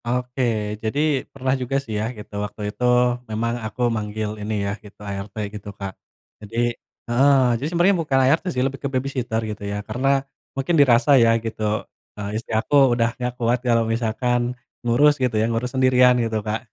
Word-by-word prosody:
Oke, 125 +2 -2 0.4
jadi 110 +6 -2 0.3
pernah 130 -1 -1
juga 125 +2 0
sih 110 - -7
ya, - - -1
gitu. 105 - -11
Waktu 105 +1 -6
itu 125 - -6 0.5
memang 115 +2 -1
aku 110 +3 -6
manggil 105 0 -3
ini 105 +1 -3
ya, 100 - -1
gitu, 105 - -15
ART 100 +1 -5 0.2
gitu 105 -1 -8
Kak. 100 -2 -5 0.5
Jadi 105 +2 -8 0.5
heeh, 135 +4 +4 0.2
jadi 145 - -1
sebenarnya 175 +3 +3
bukan 145 -4 0
ART 145 +5 +3
sih, 125 -6 0
lebih 135 0 -3
ke 140 - -2
babysitter 130 -4 -1
gitu 105 -1 -6
ya. 100 0 -3
Karena 135 +4 +1 0.3
mungkin 135 +6 0
dirasa 125 0 +4
ya 115 - +5 0.2
gitu, 110 -1 -2 0.3
eee, 100 0 -5
istri 110 +2 -5
aku 110 - -3 0.2
udah 115 -1 +1
enggak 125 -1 -3
kuat 120 0 +1
kalau 115 -2 +2
misalkan 120 +2 -1 0.2
ngurus 135 +5 +4
gitu 125 -4 +1
ya, 110 - +3
ngurus 120 +2 -1
sendirian 125 -1 +5
gitu, 110 -1 -1
Kak. 110 +3 -3
120 Hz, 180 wpm, -22 LUFS, 110-130 Hz, 0.5 s, ya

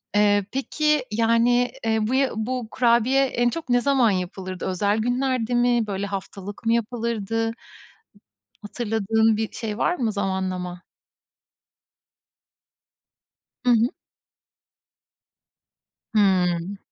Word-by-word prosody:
Eee, 205 -1 +3
peki, 300 +1 0
yani, 230 +2 +2
eee, 220 0 +2
bu 245 - -1
ya 270 0 +3
bu 240 +2 -3
kurabiye 245 +2 +3
en 240 -2 +1
çok 320 +1 -6
ne 245 0 +3
zaman 265 -4 +3
yapılırdı? 185 0 -4
Özel 200 +3 0
günlerde 245 +1 0
mi? 240 -2 +2
Böyle 200 0 -3
haftalık 200 +1 -7
mı 230 - +3
yapılırdı? 225 -1 -1 1.1
Hatırladığın 220 0 +1
bir 220 0 -3
şey 215 -2 -5
var 350 - +2
mı 235 -9 -1
zamanlama? 185 -3 -3 2.8
Hı 250 - +2
hı. 235 0 +4 2.3
Hımm. 185 -2 +2
225 Hz, 105 wpm, -23 LUFS, 200-245 Hz, 2.8 s, hı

